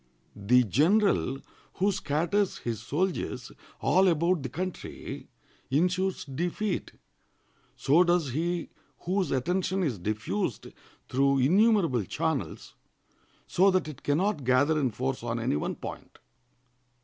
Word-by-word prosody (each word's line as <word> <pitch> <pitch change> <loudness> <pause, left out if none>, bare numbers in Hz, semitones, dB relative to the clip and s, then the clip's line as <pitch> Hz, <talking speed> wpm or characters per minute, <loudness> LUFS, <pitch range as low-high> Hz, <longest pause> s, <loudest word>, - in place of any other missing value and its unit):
The 125 +5 +4
general 155 - +2 0.4
who 200 +2 +2
scatters 175 +5 0
his 115 -2 -4
soldiers 145 -3 -2 0.3
all 190 +1 +4
about 170 0 +2
the 130 - -4
country 180 +7 -6 0.4
insures 180 +6 0
defeat; 175 +8 -3 0.8
so 155 +6 +4
does 175 -6 +1
he 170 +4 -2 0.3
whose 185 -2 0
attention 180 +8 0
is 125 - -1
diffused 105 +1 -3 0.4
through 140 +1 +2
innumerable 170 - +3
channels, - - -3 0.7
so 190 +3 +3
that 185 -4 +1
it 145 -3 -9
can 145 0 +1
not 195 -4 0
gather 140 +5 +3
in 135 -3 +1
force 130 +3 -3
on 115 0 -3
any 115 - 0
one 75 - -2
point. - - -9
155 Hz, 120 wpm, -28 LUFS, 130-185 Hz, 0.8 s, The